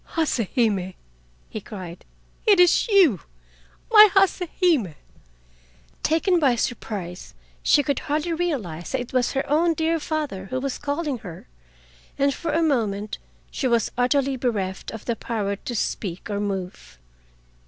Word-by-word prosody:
"Hase 270 -9 +1
Hime!" 200 -7 +1 0.5
he 215 - -7
cried, 185 -5 -9 0.4
"it 405 -3 +6
is 355 +5 +5
you, 370 - +5 0.7
my 425 -1 +10
Hase 390 -1 +4 0.2
Hime!" 290 - +2 1.1
Taken 340 +3 +2
by 270 -6 +3
surprise, 200 -6 -4 0.3
she 290 - +4
could 280 -1 -1
hardly 310 +3 -2
realize 255 - -3
that 265 - 0
it 245 - -9
was 255 -1 +1
her 270 - -1
own 325 +3 +2
dear 325 +1 0
father 295 -12 -3
who 255 +6 -3
was 270 0 -3
calling 290 -2 -2
her, 180 - -10 0.7
and 280 0 +2
for 335 - -3
a 330 +2 +2
moment 215 -8 -1 0.3
she 265 - -1
was 235 -3 +1
utterly 270 +2 +1
bereft 205 -7 -2
of 225 - -8
the 235 - -1
power 210 -4 -2
to 240 +4 -6
speak 195 -2 -3
or 200 - -1
move. 190 - -5
250 Hz, 145 wpm, -24 LUFS, 200-310 Hz, 1.1 s, my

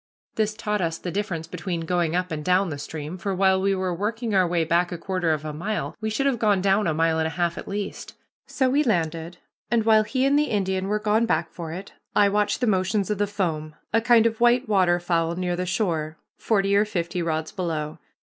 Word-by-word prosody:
This 215 -1 0
taught 210 -2 -2
us 165 -1 -1
the 175 - -5
difference 185 -5 -3
between 170 +1 -4
going 170 0 0
up 180 0 -1
and 155 -1 -3
down 185 +2 +2
the 145 -2 -5
stream, 155 +4 -6
for 195 +1 -2
while 190 0 +3
we 195 0 +2
were 185 -1 -1
working 220 +5 -2
our 185 -2 +4
way 170 -1 +1
back 170 +3 +1
a 175 - -3
quarter 180 -1 -1
of 155 -1 -2
a 155 - -4
mile, 205 +8 -3
we 220 - -1
should 245 +6 -1
have 265 -5 +1
gone 205 -3 +3
down 195 +1 +2
a 160 - +1
mile 160 0 +2
and 160 0 +1
half 170 +1 -1
at - - -8
least. 200 0 -5 0.3
So 265 - +1
we 280 +4 +3
landed, 170 - -1 0.3
and 225 -1 +1
while 220 -1 +6
he 255 +5 0
and 280 +2 +4
the 300 - +3
Indian 190 -5 -1
were 210 +1 +1
gone 215 +2 +1
back 165 -6 0
for 165 -2 -7
it, 190 +4 -8 0.2
I 205 -1 +5
watched 205 +3 0
the - - +3
motions 195 0 +1
of 210 - -2
the 205 - +2
foam, 160 -7 -3 0.2
a 225 - +4
kind 235 -1 +5
of 225 0 0
white 240 +1 +4
waterfowl 175 -4 +2
near 180 0 -1
the 180 +1 -3
shore, 165 -5 -1 0.2
forty 200 -2 +1
or 205 - +5
fifty 180 -4 -3
rods 160 -1 -2
below. 160 -5 -3
185 Hz, 230 wpm, -24 LUFS, 170-210 Hz, 0.3 s, while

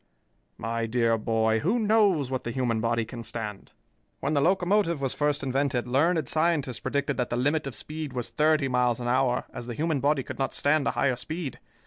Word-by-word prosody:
"My 115 +1 -2
dear 115 0 +2
boy, 110 0 +1
who 195 - +1
knows 205 - +3
what 130 - -2
the - - -4
human 120 -3 0
body 115 0 0
can 120 +1 -8
stand? 110 -3 -6 0.5
When 140 +3 -1
the 145 - +2
locomotive 180 0 +2
was 135 -2 -1
first 145 0 0
invented 135 -2 0
learned 155 +4 +2
scientists 155 -6 0
predicted 140 0 -1
that 125 - -1
the 120 - -1
limit 145 +3 +1
of 135 - -6
speed 155 -2 -6
was 125 -2 -3
thirty 155 -2 +2
miles 125 -2 +1
an 120 - -4
hour, 125 0 +2
as 120 - -6
the 120 - -5
human 155 0 0
body 140 0 +1
could - - -8
not 135 - -1
stand 145 0 +2
a - - +2
higher 130 -3 +2
speed. 155 +2 -5
135 Hz, 200 wpm, -27 LUFS, 120-155 Hz, 0.5 s, knows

